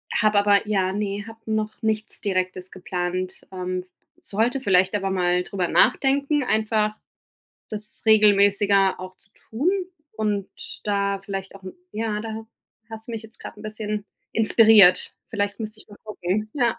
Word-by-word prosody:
habe 215 Hz, -2 st, +3 dB
aber 205 Hz, 0 st, +3 dB
ja, 190 Hz, -3 st, +1 dB
ne, 205 Hz, 0 st, -3 dB
habe 225 Hz, 0 st, -11 dB
noch 215 Hz, -1 st, -1 dB
nichts 220 Hz, -1 st, -1 dB
Direktes 185 Hz, -2 st, -2 dB
geplant, 185 Hz, 0 st, -4 dB
ähm. 185 Hz, -1 st, -4 dB, 0.3 s
Sollte 230 Hz, +6 st, 0 dB
vielleicht 190 Hz, -3 st, +3 dB
aber 195 Hz, -1 st, -1 dB
mal 180 Hz, -1 st, +1 dB
darüber 180 Hz, -1 st, -2 dB
nachdenken, 280 Hz, -, +2 dB
einfach 215 Hz, -2 st, 0 dB, 0.7 s
das 210 Hz, 0 st, -6 dB
regelmäßiger 200 Hz, -2 st, +4 dB
auch 185 Hz, 0 st, -8 dB
zu -, -, -22 dB, 0.2 s
tun 270 Hz, +11 st, +1 dB, 0.5 s
und 210 Hz, -3 st, -1 dB, 0.4 s
da 200 Hz, -1 st, 0 dB
vielleicht 195 Hz, 0 st, -6 dB
auch 195 Hz, -, -13 dB, 0.3 s
ja, 215 Hz, -1 st, -2 dB
da 225 Hz, +1 st, -6 dB
ha 220 Hz, 0 st, -7 dB, 0.4 s
hast 220 Hz, 0 st, -9 dB
du 235 Hz, -, -7 dB
mich 225 Hz, -1 st, -5 dB
jetzt 220 Hz, +1 st, -15 dB
grade 210 Hz, -, -9 dB
'n -, -, -11 dB
bisschen 215 Hz, -1 st, -4 dB, 0.3 s
inspiriert. 215 Hz, -4 st, +6 dB
Vielleicht 205 Hz, -1 st, -2 dB
müsste 215 Hz, 0 st, -6 dB
ich -, -, -17 dB
mal 205 Hz, -, -14 dB
gucken, 210 Hz, 0 st, -3 dB
ja. 240 Hz, -5 st, +1 dB
210 Hz, 155 wpm, -23 LUFS, 195-220 Hz, 0.7 s, inspiriert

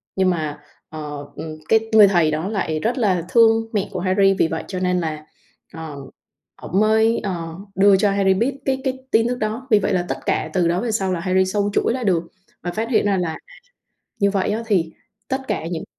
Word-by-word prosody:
Nhưng 190 Hz, -1 st, +2 dB
mà, 155 Hz, -4 st, -2 dB, 0.3 s
ờ, 150 Hz, -2 st, -7 dB
ừm, 155 Hz, -1 st, -7 dB
cái 225 Hz, 0 st, +3 dB
người 215 Hz, -2 st, +8 dB
thầy 170 Hz, -5 st, +3 dB
đó 160 Hz, +5 st, -2 dB
lại 160 Hz, -7 st, -2 dB
rất 235 Hz, +7 st, -1 dB
là 185 Hz, -7 st, +1 dB
thương 225 Hz, 0 st, +4 dB
mẹ 200 Hz, -2 st, 0 dB
của 185 Hz, -, -4 dB
Harry, 195 Hz, +2 st, +3 dB
vì -, -, +4 dB
vậy 160 Hz, -, -4 dB
cho 185 Hz, -2 st, -4 dB
nên 180 Hz, 0 st, +1 dB
là, 155 Hz, -2 st, -4 dB, 0.5 s
ờ, 160 Hz, -3 st, -7 dB, 0.6 s
ổng 190 Hz, -, -1 dB
mới, 220 Hz, +2 st, +3 dB
ờ, 170 Hz, -4 st, -4 dB, 0.2 s
đưa 195 Hz, +1 st, +5 dB
cho 200 Hz, +1 st, +2 dB
Harry 195 Hz, -1 st, +3 dB
biết 240 Hz, +8 st, -1 dB
cái 265 Hz, -1 st, 0 dB
cái 260 Hz, 0 st, -1 dB
tin 225 Hz, +1 st, +3 dB
tức 245 Hz, -, -1 dB
đó. 220 Hz, +5 st, -3 dB
Vì 215 Hz, -, +6 dB
vậy 195 Hz, -, -1 dB
là 180 Hz, -1 st, 0 dB
tất -, -, -2 dB
cả -, -, 0 dB
từ 180 Hz, -3 st, +2 dB
đó 175 Hz, +2 st, 0 dB
về 235 Hz, -1 st, -2 dB
sau 190 Hz, -3 st, 0 dB
là 170 Hz, -, -2 dB
Harry 185 Hz, +1 st, +2 dB
xâu 205 Hz, +1 st, 0 dB
chuỗi -, -, +1 dB
lại 255 Hz, 0 st, -3 dB
được 175 Hz, -4 st, +2 dB, 0.4 s
và 175 Hz, -, -2 dB
phát 220 Hz, +4 st, -3 dB
hiện 235 Hz, -, +2 dB
ra 200 Hz, -2 st, +2 dB
là 170 Hz, -3 st, -2 dB, 0.8 s
như 200 Hz, -, +3 dB
vậy 195 Hz, 0 st, 0 dB
á, 220 Hz, +2 st, -2 dB
thì 170 Hz, -7 st, +1 dB, 0.4 s
tất 265 Hz, 0 st, -2 dB
cả 180 Hz, -6 st, -2 dB
những 165 Hz, -1 st, -4 dB
190 Hz, 225 wpm, -21 LUFS, 170-220 Hz, 0.8 s, người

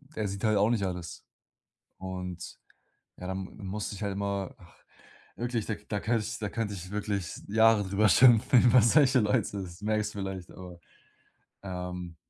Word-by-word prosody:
der 110 Hz, -2 st, -1 dB
sieht 100 Hz, +2 st, -6 dB
halt 110 Hz, -1 st, +3 dB
auch 105 Hz, +2 st, +3 dB
nicht 115 Hz, -4 st, +1 dB
alles. 90 Hz, -2 st, -5 dB, 0.7 s
Und 90 Hz, -1 st, -7 dB, 0.6 s
ja, 90 Hz, -, -7 dB
dann 95 Hz, 0 st, -4 dB
m -, -, -16 dB
dann 100 Hz, -4 st, -8 dB
musste 105 Hz, +1 st, -4 dB
ich 105 Hz, -, -6 dB
halt 100 Hz, -, -2 dB
immer 100 Hz, -1 st, -3 dB
ach, 90 Hz, -1 st, -19 dB, 0.6 s
wirklich 120 Hz, -2 st, -2 dB
da 110 Hz, -, -2 dB
k 105 Hz, -, -18 dB
da 105 Hz, -1 st, -2 dB
könnte 110 Hz, 0 st, 0 dB
ich -, -, -5 dB
da 105 Hz, -2 st, -3 dB
könnte 110 Hz, -3 st, -3 dB
ich 90 Hz, -1 st, -8 dB
wirklich 100 Hz, -4 st, -3 dB
Jahre 110 Hz, 0 st, +4 dB
darüber 100 Hz, +3 st, +2 dB
schimpfen 125 Hz, 0 st, +6 dB
über 120 Hz, 0 st, +6 dB
solche 130 Hz, +3 st, +5 dB
Leute, 105 Hz, -2 st, +1 dB
das 85 Hz, +1 st, -11 dB
merkst 105 Hz, 0 st, -1 dB
du -, -, -5 dB
vielleicht, 95 Hz, -2 st, -5 dB
aber, 90 Hz, -2 st, -11 dB, 0.8 s
ähm 90 Hz, -2 st, -6 dB
100 Hz, 185 wpm, -29 LUFS, 95-110 Hz, 0.8 s, schimpfen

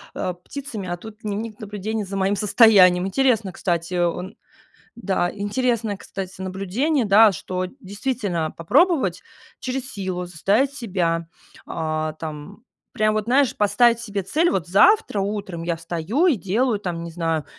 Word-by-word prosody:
э, 180 Hz, -, -2 dB
птицами, 250 Hz, -9 st, -6 dB
а 175 Hz, -, -3 dB
тут 215 Hz, +3 st, -11 dB
дневник 215 Hz, +1 st, -5 dB
наблюдений 210 Hz, +1 st, -4 dB
за 195 Hz, 0 st, -5 dB
моим 195 Hz, +1 st, +1 dB
состоянием. 195 Hz, -4 st, +5 dB
Интересно, 225 Hz, -1 st, +1 dB
кстати. 175 Hz, -1 st, -2 dB
О 175 Hz, -1 st, +2 dB
он 180 Hz, +3 st, -7 dB, 0.6 s
да, 190 Hz, -6 st, 0 dB
интересное, 215 Hz, 0 st, -1 dB
кстати, 190 Hz, -1 st, -8 dB
наблюдение, 195 Hz, -, -1 dB
да, 210 Hz, +2 st, +7 dB
что 185 Hz, +1 st, -4 dB
действительно 200 Hz, -, -2 dB
попробовать 330 Hz, -, +2 dB, 0.4 s
через 255 Hz, 0 st, -4 dB
силу 185 Hz, -3 st, -3 dB
заставить 200 Hz, -, +1 dB
себя, 175 Hz, -, -1 dB, 0.4 s
о, 155 Hz, -1 st, -2 dB
там, 155 Hz, +7 st, -8 dB, 0.3 s
прям 215 Hz, -3 st, +2 dB
вот, 215 Hz, -1 st, 0 dB
знаешь, 260 Hz, +2 st, +3 dB
поставить 230 Hz, +3 st, +3 dB
себе 205 Hz, -4 st, -3 dB
цель: 320 Hz, -, +1 dB
"Вот 180 Hz, -3 st, -1 dB
завтра 215 Hz, -, +4 dB
утром 195 Hz, -4 st, -3 dB
я 170 Hz, -1 st, -1 dB
встаю 170 Hz, -, -1 dB
и 320 Hz, -8 st, +4 dB
делаю 215 Hz, +4 st, 0 dB
там, 175 Hz, -4 st, -4 dB
не 170 Hz, -, -6 dB
знаю, 165 Hz, -2 st, -1 dB
200 Hz, 145 wpm, -22 LUFS, 180-230 Hz, 0.6 s, да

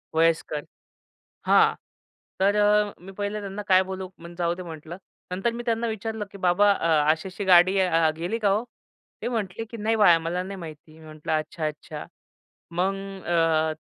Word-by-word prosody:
वयस्कर, 160 Hz, -2 st, +1 dB, 0.8 s
हां, -, -, +5 dB, 0.7 s
तर 200 Hz, +1 st, +4 dB
अ, 210 Hz, 0 st, +3 dB
मी 195 Hz, +2 st, -10 dB
पहिले 205 Hz, +1 st, -2 dB
त्यांना 200 Hz, +1 st, -6 dB
काय 185 Hz, -1 st, +6 dB
बोलू, 190 Hz, 0 st, -5 dB
मग 170 Hz, +1 st, -10 dB
जाऊदे 175 Hz, +1 st, -1 dB
म्हटलं. 165 Hz, +1 st, -8 dB, 0.3 s
नंतर 195 Hz, +6 st, 0 dB
मी 240 Hz, +1 st, -5 dB
त्यांना 230 Hz, 0 st, 0 dB
विचारलं 220 Hz, 0 st, -4 dB
की, 200 Hz, -, -10 dB
"बाबा 185 Hz, +3 st, +4 dB
अ, 165 Hz, -4 st, -1 dB, 0.2 s
अशी, 160 Hz, +4 st, -4 dB
अशी 195 Hz, +2 st, -6 dB
गाडी 185 Hz, +1 st, +6 dB
अ, 165 Hz, -4 st, +3 dB
गेली 175 Hz, +8 st, -2 dB
का 210 Hz, -3 st, +2 dB
हो?" 210 Hz, +4 st, +1 dB, 0.6 s
ते -, -, -1 dB
म्हटले, 225 Hz, -2 st, -3 dB
"की 230 Hz, +1 st, -9 dB
नाही 220 Hz, +1 st, 0 dB
बाळा 175 Hz, -6 st, +6 dB
मला 170 Hz, +2 st, -2 dB
नाही 195 Hz, +1 st, -7 dB
माहिती." 155 Hz, -1 st, -11 dB
मी 155 Hz, -, -14 dB
म्हटलं 155 Hz, 0 st, -6 dB
"अच्छा, 155 Hz, +1 st, -4 dB
अच्छा." 150 Hz, 0 st, -6 dB, 0.7 s
मग 190 Hz, +3 st, +1 dB, 0.3 s
अ, 160 Hz, -2 st, +2 dB
185 Hz, 175 wpm, -25 LUFS, 165-205 Hz, 0.8 s, काय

